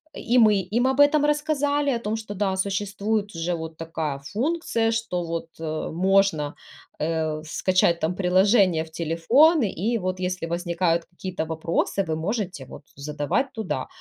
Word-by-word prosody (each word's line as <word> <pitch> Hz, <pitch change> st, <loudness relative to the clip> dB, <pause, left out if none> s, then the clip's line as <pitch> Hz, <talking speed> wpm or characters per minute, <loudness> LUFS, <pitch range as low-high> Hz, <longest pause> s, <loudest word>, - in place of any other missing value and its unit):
И 245 Hz, -, 0 dB
мы 215 Hz, -2 st, +6 dB
им 220 Hz, +8 st, 0 dB
об 265 Hz, +1 st, 0 dB
этом 290 Hz, +1 st, +5 dB
рассказали, 290 Hz, -1 st, +1 dB
о 240 Hz, -, 0 dB
том, 215 Hz, -1 st, -2 dB
что, 220 Hz, -2 st, -6 dB
да, 195 Hz, -1 st, 0 dB
существует 205 Hz, +1 st, -2 dB
уже 165 Hz, +2 st, -1 dB
вот 160 Hz, -1 st, -7 dB
такая 160 Hz, -3 st, -3 dB
функция, 230 Hz, -, -1 dB
что 225 Hz, -6 st, -2 dB
вот, 165 Hz, 0 st, -4 dB
э, 155 Hz, -1 st, -3 dB
можно, 185 Hz, -4 st, +2 dB, 0.4 s
э, 155 Hz, -1 st, -1 dB
скачать 170 Hz, +1 st, +2 dB
там 165 Hz, +3 st, -1 dB
приложение 185 Hz, -1 st, +3 dB
в 160 Hz, -, -14 dB
телефон 195 Hz, -, +3 dB
и 220 Hz, +2 st, 0 dB
вот, 185 Hz, -1 st, -3 dB
если 180 Hz, -2 st, -2 dB
возникают 170 Hz, 0 st, 0 dB
какие-то 175 Hz, -2 st, -5 dB
вопросы, 165 Hz, +4 st, -1 dB
вы 160 Hz, -3 st, -2 dB
можете, 180 Hz, -, -3 dB
вот, -, -, -11 dB
задавать 150 Hz, -, -2 dB
туда. 210 Hz, -, -3 dB
185 Hz, 155 wpm, -24 LUFS, 165-225 Hz, 0.4 s, мы